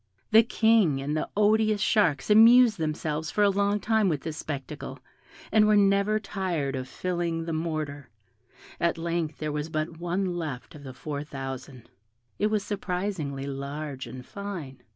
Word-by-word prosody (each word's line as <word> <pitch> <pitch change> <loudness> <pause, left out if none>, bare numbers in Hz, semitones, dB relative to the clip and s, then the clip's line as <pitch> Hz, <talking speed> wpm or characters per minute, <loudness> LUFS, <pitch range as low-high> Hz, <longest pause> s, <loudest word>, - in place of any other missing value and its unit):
The 220 +1 +8
King 220 - +3
and 145 +3 -2
the 155 - -2
odious 215 0 +3
sharks 200 -5 +2
amused 230 0 +7
themselves 155 0 -2
for 210 - +1
a 200 - +5
long 200 +1 +1
time 220 -2 +2
with 150 -5 -1
this 160 -1 -5
spectacle, 140 -4 -6 0.5
and 215 -1 +5
were 215 - +5
never 200 +1 +3
tired 180 -9 -2
of 130 0 -4
filling 170 -1 -2
the 165 - -3
mortar; 155 -4 -3 0.7
at 170 0 +1
length 165 -2 -2
there 155 -1 -3
was 150 +1 -3
but 160 +1 -3
one 175 +1 -1
left 145 -7 -5
of 150 - -12
the 130 -2 -9
four 145 +1 -5
thousand; 135 -3 -7 0.5
it 210 - +3
was 215 -2 0
surprisingly 180 -8 -3
large 140 0 -5
and 125 +1 -9
fine. 175 -11 -7
165 Hz, 160 wpm, -27 LUFS, 145-205 Hz, 0.7 s, The